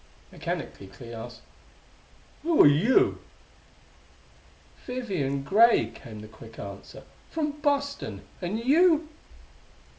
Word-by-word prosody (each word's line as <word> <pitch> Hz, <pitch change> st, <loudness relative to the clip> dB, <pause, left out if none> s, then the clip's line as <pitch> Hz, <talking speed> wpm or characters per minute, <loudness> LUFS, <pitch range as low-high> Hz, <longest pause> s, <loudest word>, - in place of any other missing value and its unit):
Mechanically 95 Hz, -, -5 dB
Clee 115 Hz, +4 st, -11 dB
asked: 115 Hz, +1 st, -9 dB, 1.0 s
"Who 330 Hz, 0 st, +5 dB
are -, -, +9 dB
you?" 215 Hz, -, +4 dB, 1.7 s
"Vivian 185 Hz, -, -2 dB
Gray," 225 Hz, +10 st, +4 dB
came 110 Hz, -2 st, -11 dB
the 110 Hz, -, -10 dB
quick 110 Hz, +1 st, -14 dB
answer; 100 Hz, 0 st, -9 dB, 0.3 s
"from 305 Hz, -2 st, -1 dB
Boston. 285 Hz, -1 st, -1 dB, 0.2 s
And 185 Hz, +4 st, -2 dB
you?" 315 Hz, +5 st, +4 dB
200 Hz, 95 wpm, -27 LUFS, -, 1.7 s, are